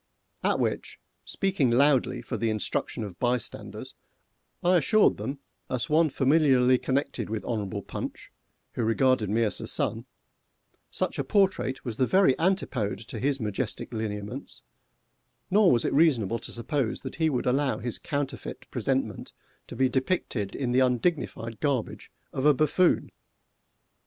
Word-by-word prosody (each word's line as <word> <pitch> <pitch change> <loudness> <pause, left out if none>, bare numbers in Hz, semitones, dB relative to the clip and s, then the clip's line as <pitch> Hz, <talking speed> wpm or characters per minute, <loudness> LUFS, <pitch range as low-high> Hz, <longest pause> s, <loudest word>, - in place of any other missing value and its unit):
At - - +2
which, - - -2 0.3
speaking 190 -10 0
loudly 130 -1 +3
for - - -4
instruction 110 0 -1
of 95 -5 -8
bystanders, 125 -1 -3 0.7
I 180 +1 +5
assured 215 +6 +4
them, 135 +2 -4 0.3
as 130 +5 -2
one 160 +1 +4
familiarly 135 -3 +4
connected 135 -4 -2
with 110 -1 -3
Hon'ble 105 -5 -3
Punch, - - -7 0.4
who - - -3
regarded 115 -1 +2
me 115 +3 +2
as 105 - +2
a - - -5
son, - - 0 0.8
such - - -1
a - - +1
portrait 190 -11 +1
was 115 -3 -4
the 130 - +2
very 190 -7 +5
antipode 140 - 0
to 115 - -5
his 140 +2 0
majestic 110 +2 -3
lineaments, 110 - -5 0.9
nor 200 -1 +5
was 120 - +2
it - - 0
reasonable 120 - +3
to - - -7
suppose 120 +1 -2
that 130 - -7
he 160 -1 +2
would 130 -3 -1
allow 130 -2 +1
his 120 0 -4
counterfeit 145 -2 -4
presentment - - -2 0.3
to - - -8
be 130 - +3
depicted 130 - -1
in 130 -3 -2
the 125 - +3
undignified 125 -3 0
garbage 140 -6 -2 0.2
of 130 - -2
a 150 -1 +5
buffoon! 155 +5 +2
130 Hz, 145 wpm, -27 LUFS, 115-145 Hz, 0.9 s, I